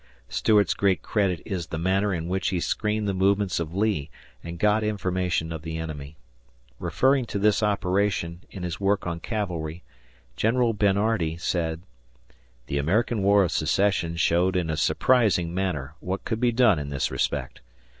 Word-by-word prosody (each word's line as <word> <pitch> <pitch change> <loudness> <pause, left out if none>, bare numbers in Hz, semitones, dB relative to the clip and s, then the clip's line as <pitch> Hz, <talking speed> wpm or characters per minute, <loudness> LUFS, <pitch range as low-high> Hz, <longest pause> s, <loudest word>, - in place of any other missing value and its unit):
Stuart's 105 - +3
great 100 -2 +1
credit 95 -5 0
is 90 -6 -4
the 80 - -4
manner 95 +4 +1
in 85 -3 -3
which 95 0 0
he 90 -2 -1
screened 105 +3 -1
the 100 - 0
movements 95 0 +1
of 85 +1 -4
Lee 100 -8 0 0.3
and 85 +1 -7
got 105 +3 +2
information 90 -5 -1
of 80 -2 -5
the 80 0 -5
enemy. 75 -2 -6 0.6
Referring 135 -1 +2
to 105 - -3
this 105 +1 +3
operationin 100 -4 0
his 90 -3 -5
work 100 0 +1
on 85 -1 -3
Cavalry, 90 -6 -4 0.5
General 115 +1 +2
Bernhardi 100 -4 +1
said: 85 -1 -2 0.8
The 70 +3 -2
American 105 +8 +1
War 100 +1 +5
of 85 - -1
Secession 85 +1 +1
showed 90 +3 +2
in 85 -3 0
a - - -1
surprising 90 - +2
manner 85 -7 -2
what 95 +2 -4
could 110 -2 -2
be 120 0 +3
done 115 -8 +4
in 70 -1 -5
this 70 -2 -1
respect. - - -2
95 Hz, 160 wpm, -25 LUFS, 85-105 Hz, 0.8 s, War